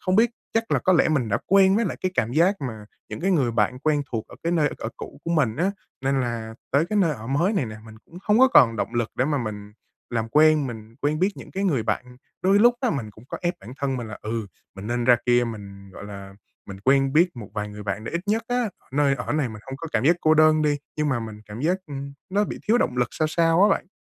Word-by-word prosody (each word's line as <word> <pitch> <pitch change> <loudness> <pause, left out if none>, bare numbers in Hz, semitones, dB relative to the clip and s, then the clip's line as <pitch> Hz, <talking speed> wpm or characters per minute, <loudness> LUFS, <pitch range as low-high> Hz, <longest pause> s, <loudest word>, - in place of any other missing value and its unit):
không 185 +1 +1
biết 235 +1 +5 0.2
chắc 225 0 0
là - - +3
có 185 - +2
lẽ 170 - +4
mình 140 -8 +1
đã - - +1
quen 195 0 +5
với 230 - +2
lại - - -3
cái 185 0 -1
cảm 120 -6 0
giác 175 +8 +3
mà 110 -6 -5 0.2
những - - -6
cái 190 +3 +1
người 140 -9 +2
bạn 115 +3 +1
quen 150 0 +1
thuộc 110 -2 -2
ở - - -13
cái 170 +1 0
nơi 155 -3 +3
ở - - -4
cũ - - -9
của 170 - -3
mình 140 -9 +1
á, 180 +5 +1 0.3
nên 135 +1 +1
là 115 -2 -3 0.2
tới 145 +5 +2
cái 210 - -2
nơi 165 -5 +3
ở 110 -3 -9
mới 165 - +1
này 155 - 0
nè, 110 - -7
mình 110 - -12
cũng 175 - -13
hông 210 +1 +3
có 260 +1 +7
còn 115 - +6
động 115 - -3
lực 120 -1 0
để 130 - +2
mà 145 0 0
mình 105 -3 -6 0.4
làm 115 -1 -1
quen, 155 +1 +4
mình 110 -2 -8
quen 150 +1 +1
biết 190 +3 +3
những - - -10
cái 195 +1 -2
người 145 - +1
bạn. 125 +3 -3 0.3
Đôi 195 +2 +4
lúc 240 +3 +6
á 250 - +1
mình 115 -8 -3
cũng 110 +3 -17
có - - -5
ép 175 +1 0
bản 125 - -10
thân 135 -2 -1
mình 120 -2 -5
là, 105 - -8
ừ, 110 -1 -3 0.3
mình 95 +2 -7
nên 120 0 -1
ra 120 -1 +6
kia, 120 0 +4
mình, 100 -4 -8
gọi 100 - -9
là, 100 -1 -9 0.3
mình 95 -1 -9
quen 135 0 +3
biết 170 -2 +3
một 105 -4 -8
vài 105 0 -3
người 105 0 -9
bạn 100 +2 -4
để - - -6
ít 170 - -1
nhất 220 +3 +1
á 245 0 +1 0.2
ở - - -33
nơi 140 -1 +3
ở - - -4
này 150 -4 0
mình 110 0 -10
hông 135 - -6
có 165 +4 -7
cảm 115 +2 +1
giác 170 +3 +5
cô 155 0 +4
đơn 155 0 +5
đi, 150 -1 +2 0.2
nhưng 150 -1 0
mà 130 -4 0
mình 110 -2 -7
cảm 105 +3 -8
giác, 180 +5 +1
ưm, 140 -1 -6 0.2
nó 205 +2 +2
bị - - -6
thiếu 235 +2 +5
động 125 - 0
lực 120 -1 +1
sao 155 -1 0
sao 165 +3 +3
á 210 - +6
bạn. 195 - 0
135 Hz, 285 wpm, -24 LUFS, 115-170 Hz, 0.4 s, có